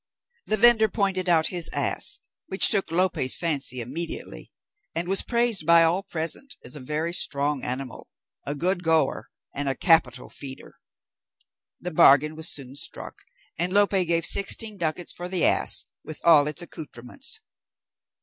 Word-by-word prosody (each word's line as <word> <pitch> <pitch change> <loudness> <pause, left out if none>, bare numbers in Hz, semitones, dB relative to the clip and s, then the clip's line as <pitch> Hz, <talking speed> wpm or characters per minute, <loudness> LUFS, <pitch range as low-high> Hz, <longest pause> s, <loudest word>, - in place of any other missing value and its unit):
The 215 - +1
vendor 225 -1 +5
pointed 190 -3 -1
out 160 -2 +3
his 175 -2 +2
ass, - - +2 0.3
which 190 - +5
took 200 -3 +1
Lope's 170 -7 0
fancy 140 -7 -2
immediately, 155 +8 -6 0.4
and 170 +1 -2
was 195 +1 +3
praised 235 -8 -1
by 170 0 +6
all 170 +4 +1
present, 195 - -5
as 125 - -9
a - - -7
very 155 +5 -3
strong 145 -4 0
animal, 130 0 -5 0.3
a 145 - -4
good 180 +5 +1
goer, 160 -5 0 0.2
and 140 0 -3
a 135 - -2
capital 135 -7 +2
feeder. 135 -2 -8 1.0
The 180 - -5
bargain 150 0 +5
was 160 0 -2
soon 135 -2 -4
struck, - - -6 0.4
and 175 +2 0
Lope 205 +1 +3
gave 170 -4 +1
sixteen 205 +1 +1
ducats 170 +1 -3
for 175 +1 -7
the 185 -2 +1
ass, - - +1 0.2
with 155 - -8
all 155 -4 +5
its 155 +3 -5
accoutrements. 160 - -8
165 Hz, 150 wpm, -25 LUFS, 145-190 Hz, 1.0 s, by